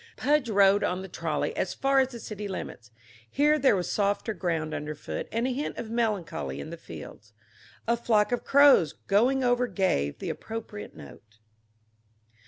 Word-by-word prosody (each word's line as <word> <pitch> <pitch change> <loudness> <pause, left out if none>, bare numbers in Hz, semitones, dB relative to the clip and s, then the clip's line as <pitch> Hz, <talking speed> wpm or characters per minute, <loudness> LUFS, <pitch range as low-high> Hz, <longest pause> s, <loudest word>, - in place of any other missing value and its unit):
Pudge 290 -4 +1
rode 200 -1 +4
on 180 +1 -1
the - - -7
trolley 165 -4 -2
as 185 - -2
far 275 0 +2
as 260 - +3
the 245 -2 -9
city 210 -2 -6
limits. 120 -10 -7 0.4
Here 300 - +3
there 265 -7 +4
was 180 -2 -2
softer 205 +2 0
ground 165 -5 -2
underfoot 150 0 -5
and 230 +2 0
a 260 - 0
hint 285 +4 -4
of 220 - -6
melancholy 195 - -2
in 70 - -7
the - - -5
fields. 105 0 -11 0.5
A 235 - +3
flock 220 -2 +2
of 245 - -1
crows 275 - +5
going 250 +7 +3
over 245 0 +2
gave 180 - 0
the - - -4
appropriate 220 -2 -7
note. 105 - -14
210 Hz, 170 wpm, -27 LUFS, 170-245 Hz, 0.5 s, crows